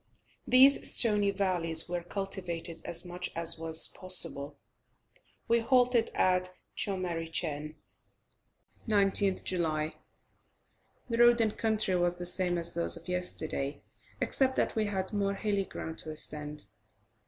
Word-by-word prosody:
These 265 +2 +5
stony 210 -4 +4
valleys 180 -5 +2
were 175 0 -3
cultivated 175 -3 -5
as 170 +1 -1
much 180 +1 -4
as 165 -1 +3
was 160 0 +4
possible. 150 -6 +3 0.9
We 235 0 +3
halted 245 -1 +2
at 185 0 +1 0.3
Tschomarichen. 165 -5 -3 1.1
19th 200 -2 +1
July. 155 -4 -2 1.1
The 230 -2 -3
road 240 0 +6
and 220 -2 0
country 220 -4 0
was 175 0 0
the 175 0 -7
same 180 0 0
as 170 0 +1
those 170 0 +1
of 170 - -11
yesterday, 160 -5 -2 0.4
except 265 -1 0
that - - -1
we 220 -1 0
had 190 -1 -4
more 200 -1 -1
hilly 200 -1 -2
ground 160 -3 -8
to 160 - -6
ascend. 150 -3 -3
180 Hz, 125 wpm, -29 LUFS, 165-205 Hz, 1.1 s, road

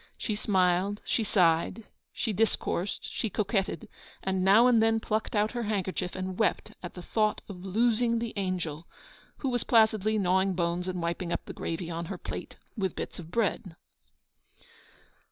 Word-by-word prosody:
She 215 - -2
smiled, 190 -1 +2
she 225 - +1
sighed, 180 +1 +2 0.3
she 220 - -2
discoursed, 205 -2 0
she 225 - -2
coquetted, 195 -4 -1 0.4
and 190 -1 0
now 205 +5 +7
and 240 -3 +5
then 225 0 +3
plucked 220 0 -2
out 210 +1 +2
her 240 - -3
handkerchief 195 -4 -2
and 185 +1 -4
wept 220 - +1
at 175 - -7
the 180 - -8
thought 215 +3 +1
of 185 -3 -9
losing 230 +4 +2
the 230 0 -3
angel, 175 -5 -3 0.5
who 270 - -2
was 245 -2 0
placidly 220 -2 +4
gnawing 190 0 +2
bones 175 0 -1
and 180 -2 -3
wiping 170 +1 -2
up - - -2
the - - -7
gravy 165 +1 -4
on 170 +1 -3
her 190 +1 -5
plate - - -6 0.2
with 195 -5 -1
bits - - -5
of 165 -2 -9
bread. 185 -4 -1
195 Hz, 165 wpm, -29 LUFS, 180-220 Hz, 0.5 s, now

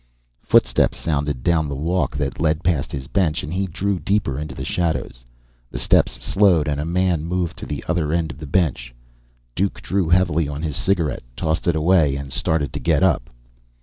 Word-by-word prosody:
Footsteps - - +3
sounded 75 -5 -2
down 80 -3 +2
the 70 - -3
walk 80 -1 -1
that 70 -2 -3
led 80 +1 +1
past 80 -6 0
his 65 -2 -5
bench, 85 -3 0
and 75 - -5
he 95 +1 -1
drew 95 +2 -2
deeper 90 -5 0
into 75 0 -6
the - - -5
shadows. 80 -8 -2 0.5
The - - -6
steps - - +3
slowed 95 -7 +3
and 75 -1 -1
a - - -3
man 90 -2 +1
moved 85 0 -2
to - - -7
the 75 - -4
other 85 -4 0
end 80 -1 0
of 80 - -12
the 75 - -7
bench. 70 -8 0 0.6
Duke 95 +8 -1
drew 95 -4 -1
heavily 85 -3 +3
on 75 +2 -5
his 75 -3 -2
cigarette, 85 -7 0
tossed 80 +6 -1
it 85 - +3
away, 80 -3 +3
and 70 -1 -6
started 75 -2 0
to 70 - -3
get 65 - +2
up. - - +2
80 Hz, 195 wpm, -21 LUFS, 75-90 Hz, 0.6 s, Footsteps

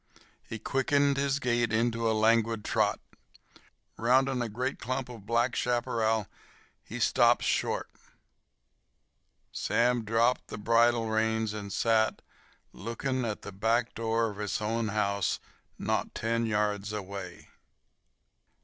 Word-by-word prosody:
He 115 - -7
quickened 140 +4 +1
his 140 0 +1
gait 120 -4 0
into 115 0 +1
a - - +2
languid 115 0 +2
trot. - - +1 1.0
Rounding 130 +2 +2
a 120 - -2
great 125 +5 -3
clump 130 +2 -3
of 110 -5 -11
black 120 +2 +1
chaparral 115 -3 0 0.6
he - - -7
stopped - - +4
short. - - 0 1.6
Sam 120 0 +1
dropped 115 +3 +1
the - - -7
bridle 115 +2 +3
reins 110 0 0
and 100 -2 -6
sat, 110 +1 +1 0.5
looking 115 +5 -3
into 115 -5 -2
the - - -7
back 115 +4 0
door 115 0 0
of 100 - -11
his 105 -2 -2
own 110 +1 -1
house, 100 -2 0 0.4
not - - -2
ten 115 0 0
yards 105 -1 0
away. 100 -2 -7
115 Hz, 120 wpm, -29 LUFS, 110-120 Hz, 1.6 s, stopped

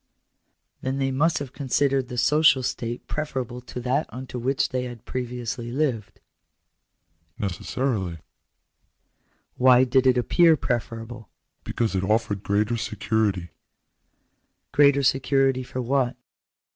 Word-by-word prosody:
" - - -50
Then 130 +1 -2
they 135 -1 0
must 155 +5 +2
have 140 -2 -6
considered 135 -1 0
the 125 - -7
social 150 0 +4
state 120 -1 -4
preferable 130 -5 -4
to 125 0 -8
that 130 +5 0
under 125 0 -7
which 130 +3 0
they 125 -1 -2
had 120 -2 -9
previously 120 -1 -4
lived? 125 -7 -2 0.4
" - - -53
" - - -52 0.3
Necessarily." 100 -1 -2 0.7
" - - -46
Why 125 0 +6
did 130 +1 +3
it 125 -1 +4
appear 165 +6 +4
preferable 115 -4 -4
?" - - -54
" - - -50
Because 115 -3 -1
it 95 -1 0
offered 105 -1 0
greater 105 +4 0
security." 105 -5 -1 0.6
" - - -48
Greater 140 -1 +4
security 135 0 +2
for 130 0 -5
what 130 0 +1
125 Hz, 140 wpm, -24 LUFS, 115-135 Hz, 0.7 s, Why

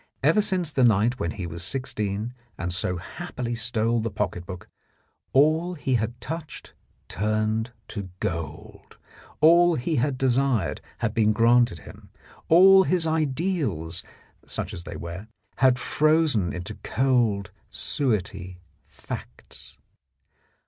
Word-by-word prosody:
Ever 215 - +5
since 185 -5 -1
the 130 - +2
night 115 +2 +3
when 85 - -1
he 90 +2 -5
was 85 0 -6
sixteen 110 -1 -3 0.2
and 90 0 -3
so 90 0 -1
happily 120 +7 -5
stole 115 0 0
the 115 +1 -2
pocket 90 -3 -3
book, 90 -2 -8 0.6
all 160 +6 +3
he 135 -4 -2
had 115 0 -1
touched 155 +5 -7 0.3
turned 110 +3 -1 0.2
to 100 -3 -6
gold, 85 -6 -6 0.4
all 170 +2 +6
he 155 +4 -1
had 130 +2 0
desired 130 - +1 0.2
had 110 -2 -1
been 110 -1 +3
granted 115 -6 +3
him, - - -13 0.4
all 190 +3 +8
his 180 -3 +1
ideals 150 - -1 0.5
(such - - -3
as 85 - -7
they - - -7
were) 85 +5 -7 0.3
had 130 -2 +4
frozen 155 - +2
into 90 -1 -6
cold 115 -7 +1 0.2
suetty 100 -7 -1 0.3
facts. - - -10
115 Hz, 125 wpm, -25 LUFS, 100-145 Hz, 0.6 s, all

